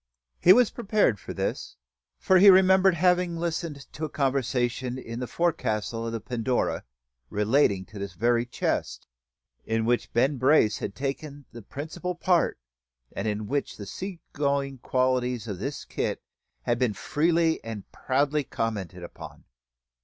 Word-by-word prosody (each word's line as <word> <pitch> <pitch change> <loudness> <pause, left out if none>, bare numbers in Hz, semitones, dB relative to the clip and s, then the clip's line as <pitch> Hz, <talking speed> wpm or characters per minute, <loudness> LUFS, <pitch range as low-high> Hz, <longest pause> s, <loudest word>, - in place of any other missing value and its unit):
He 180 - +7
was 245 +3 +6
prepared 205 - +1
for - - -8
this; - - -3 0.4
for 190 -1 +4
he 200 +2 +9
remembered 190 0 +6
having 180 0 +2
listened 165 -3 -3
to 155 - -7
a 155 - -1
conversation 130 -2 -1
in 115 -2 -6
the 125 - -3
forecastle 115 -9 -1
of - - -3
the 115 - -3
Pandora, 125 +2 -1 0.4
relating 105 -2 +2
to 105 +2 -11
this 100 -1 -5
very 120 +6 +2
chest, 120 - -2 0.6
in 110 0 -1
which 120 +1 0
Ben 135 +4 +2
Brace 130 -4 +4
had 100 - -5
taken 140 +1 -5
the 120 0 -10
principal 160 - -5
part, 175 0 +2 0.6
and - - -2
in 105 0 -2
which 140 +5 -2
the 100 - -7
sea 185 - -6
going 140 -2 -1
qualities 125 -2 0
of 100 -4 -5
his 140 +7 -4
kit - - -3 0.4
had 120 0 0
been 120 -5 +1
freely 165 - +1
and 110 -3 -6
proudly 140 +3 0
commented 100 -8 -4
upon. 85 - -10
130 Hz, 150 wpm, -26 LUFS, 115-160 Hz, 0.6 s, he